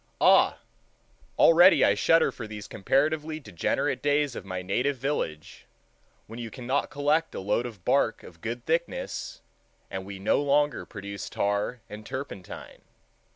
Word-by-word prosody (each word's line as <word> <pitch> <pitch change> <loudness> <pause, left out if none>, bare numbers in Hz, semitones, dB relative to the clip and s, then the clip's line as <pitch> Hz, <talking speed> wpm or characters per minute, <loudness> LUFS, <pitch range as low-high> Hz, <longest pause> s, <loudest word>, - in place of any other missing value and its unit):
Ah! - - +5 0.8
already 175 +3 +7
I - - +4
shudder 165 0 +3
for 115 - -8
these 105 -1 -8
comparatively 155 +7 0
degenerate 105 - -1
days 145 -2 +1
of - - -6
my 95 -1 -5
native 125 +9 0
village, 120 - -4 0.6
when 115 +2 -9
you 115 -2 -5
cannot 130 +3 -2
collect 150 +3 0
a - - -3
load 105 +5 0
of 105 -8 -12
bark - - +2
of 85 -2 -14
good 120 +2 -5
thickness, 165 +1 -3 0.5
and 95 - -4
we 100 0 -8
no 95 +8 +1
longer 145 -1 +1
produce 100 -1 -7
tar 100 +4 -1
and 105 +1 -9
turpentine. 120 -7 -8
120 Hz, 145 wpm, -27 LUFS, 100-145 Hz, 0.8 s, already